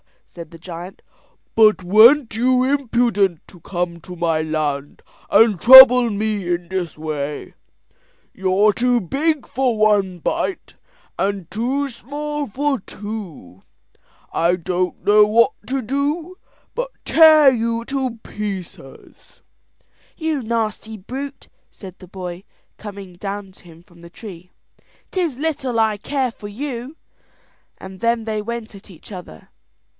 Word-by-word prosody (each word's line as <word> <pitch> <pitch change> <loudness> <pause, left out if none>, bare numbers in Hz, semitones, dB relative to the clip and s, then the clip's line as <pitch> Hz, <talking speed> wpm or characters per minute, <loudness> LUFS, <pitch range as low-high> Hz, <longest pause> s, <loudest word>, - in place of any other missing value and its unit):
said 170 -2 -11
the 165 - -13
giant; 175 +2 -9 0.5
"but 215 -3 +4
weren't 230 +7 +5
you 255 +2 +2
impudent 235 - 0
to 180 - -16
come 175 0 -4
to 180 +2 -10
my 165 -2 0
land 150 -3 -3 0.3
and 220 -6 +4
trouble 250 -1 +10
me 210 -2 -2
in 175 0 -2
this 185 -4 -4
way? 150 -2 -5 0.8
You're 190 +2 +2
too 245 +3 +1
big 290 - -1
for 255 -3 -1
one 205 -4 +2
bite, 340 - -3 0.4
and 195 -3 -2
too 260 +7 -1
small 290 +4 -5
for 275 +4 -1
two. 190 - -9 0.7
I 170 +2 +1
don't 180 0 -3
know 210 0 +6
what 230 +5 +3 0.2
to 270 +1 -1
do 295 +9 -3 0.4
but - - -3 0.2
tear 310 -3 +7
you 230 -1 -2
to 265 -3 -3
pieces." 190 -9 -9 0.8
"You 315 -4 -2
nasty 220 -1 -3
brute," 270 +8 -8 0.2
said 185 -3 -12
the 185 - -13
cowboy, 180 0 -8 0.3
coming 200 -3 -10
down 200 0 -6
to 185 - -21
him 165 0 -16
from 175 -2 -22
the 170 0 -13
tree, 180 -2 -11 0.6
"'tis 340 -9 -2
little 275 -5 -2
I 220 -2 +2
care 260 +3 -2
for 210 -2 -10
you;" 250 +4 -6 0.8
and 190 0 -11
then 230 0 0
they 215 -1 -3
went 230 0 -6
at 200 +1 -15
each 180 +2 -15
other. 180 - -11
215 Hz, 130 wpm, -20 LUFS, 180-255 Hz, 0.8 s, trouble